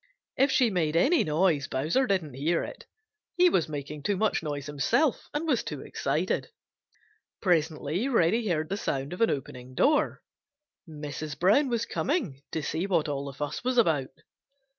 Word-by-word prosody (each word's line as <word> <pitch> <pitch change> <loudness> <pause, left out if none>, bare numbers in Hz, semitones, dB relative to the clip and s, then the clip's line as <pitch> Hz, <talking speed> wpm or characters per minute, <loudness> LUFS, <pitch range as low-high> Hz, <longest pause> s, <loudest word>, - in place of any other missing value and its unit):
If 270 +2 +3
she 245 -4 +3
made 165 -4 0
any 290 - +4
noise, 155 -2 +1
Bowser 160 - +1
didn't 180 - 0
hear 155 +6 0
it. - - -9 0.5
He 360 0 +6
was 165 - +1
making 150 0 -6
too 195 +7 0
much 215 +2 +1
noise 145 -3 -4
himself 145 - +1
and 300 +3 -2
was 265 -6 +2
too - - -6
excited. - - -1 0.9
Presently 165 - 0
Reddy 225 -2 +2
heard 155 -4 0
the 195 - -1
sound 140 -6 -2
of 180 - -7
an 230 - +5
opening 130 -2 -5
door. 295 - +2 0.7
Mrs. 150 0 -6
Brown 215 - +4
was 235 -1 0
coming 235 - -2
to 160 - -2
see 160 +6 -2
what 175 -6 +1
all 140 -1 -3
the 140 - -6
fuss 145 - -4
was 255 0 0
about. 160 - +3
165 Hz, 165 wpm, -28 LUFS, 145-230 Hz, 0.9 s, He